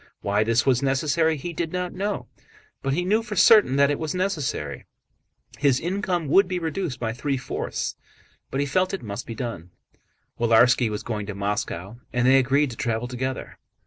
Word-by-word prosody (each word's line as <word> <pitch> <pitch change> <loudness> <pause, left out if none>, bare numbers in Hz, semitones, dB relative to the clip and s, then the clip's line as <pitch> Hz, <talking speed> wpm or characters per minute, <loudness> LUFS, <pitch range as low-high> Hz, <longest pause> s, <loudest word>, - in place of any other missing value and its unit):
Why 105 +1 +1
this 115 +3 +2
was 125 -2 +3
necessary 150 +4 +1
he 170 +5 -5
did 165 0 -3
not 180 -1 -3
know, 200 -8 -2 0.6
but 135 - -1
he 175 +5 0
knew 215 +4 +2
for 225 -2 -6
certain 200 - +6
that 140 +1 +4
it 145 - -2
was 160 +1 -3
necessary. 150 - -2 0.7
His 140 -3 +3
income 180 -2 -1
would 195 +6 +5
be 185 0 -2
reduced 165 -3 -3
by 115 -2 -2
three 135 +2 -2
fourths, 130 - -4 0.5
but 135 - -3
he 145 - +1
felt 185 +7 +1
it 190 - -9
must 100 -2 -6
be 115 - -6
done. 115 - -5 0.7
Willarski 120 +1 +4
was 105 -1 -4
going 105 -3 -4
to 105 - -5
Moscow 100 0 -3
and 125 0 +1
they 135 +1 +6
agreed 135 +2 +2
to 115 - -9
travel 115 -1 -1
together. 130 +1 -5
135 Hz, 185 wpm, -24 LUFS, 115-175 Hz, 0.7 s, certain